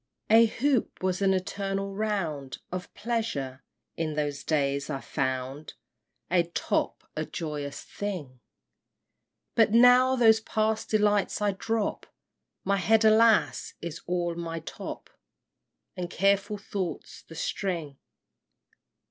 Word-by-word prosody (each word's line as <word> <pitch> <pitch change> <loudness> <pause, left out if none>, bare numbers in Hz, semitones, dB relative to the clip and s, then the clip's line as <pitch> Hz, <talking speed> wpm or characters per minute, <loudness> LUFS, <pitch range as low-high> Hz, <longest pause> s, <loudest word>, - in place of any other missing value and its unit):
II. - - +8
A 230 - +8
hoop 250 -3 0
was 185 0 0
an 195 -1 +4
eternal 195 +1 -2
round 170 -11 -2
Of 180 0 -5
pleasure. 140 - -3 0.3
In 155 -2 -2
those 145 -1 -2
days 140 -2 0
I 140 -3 -2
found 130 +3 -3 0.6
A 180 -1 +5
top 170 0 -2
a - - -1
joyous 145 -3 -5
thing; 170 -11 -6 1.1
But 225 -1 +4
now 250 +2 +7
those 225 -3 +6
past 220 0 -1
delights 210 -2 +2
I 205 -1 +2
drop, 220 +2 -2 0.6
My 200 +1 +1
head, 220 +3 +3
alas! 220 0 +4
is 170 -1 -6
all 175 -1 0
my 165 -1 -5
top, - - -7 0.9
And 180 -2 -4
careful 200 +2 +1
thoughts 195 -3 -5
the 165 - -13
string! 165 -5 -3
190 Hz, 120 wpm, -28 LUFS, 155-215 Hz, 1.1 s, II